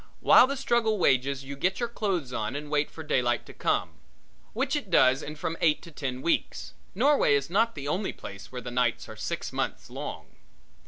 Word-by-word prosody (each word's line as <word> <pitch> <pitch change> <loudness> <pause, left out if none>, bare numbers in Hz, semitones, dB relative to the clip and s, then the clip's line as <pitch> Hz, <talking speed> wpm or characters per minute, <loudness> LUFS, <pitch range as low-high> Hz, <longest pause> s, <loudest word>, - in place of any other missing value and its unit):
While 255 - +7
the 275 +1 -3
struggle 235 -4 +1
wages 135 -4 +2
you 140 +1 -7
get 185 +7 0
your 235 - 0
clothes 190 - -2
on 110 +4 -2
and 145 +1 -6
wait 150 0 +1
for 160 - -9
daylight 120 -5 +1
to - - -12
come, - - 0 0.6
which 265 +5 0
it 285 -9 -3
does 130 -5 +5
in 150 - -6
from 165 +2 -4
eight 155 -2 +3
to 170 - -11
ten 130 -4 -4
weeks. 170 - -1 0.2
Norway 265 - +4
is 140 +3 -1
not 225 +4 +2
the 140 -1 -6
only 185 +7 -1
place 100 0 -10
where 125 -1 -6
the 125 +1 -7
nights 120 -2 0
are - - -9
six - - -4
months - - -3
long. - - -6
150 Hz, 205 wpm, -27 LUFS, 130-210 Hz, 0.6 s, While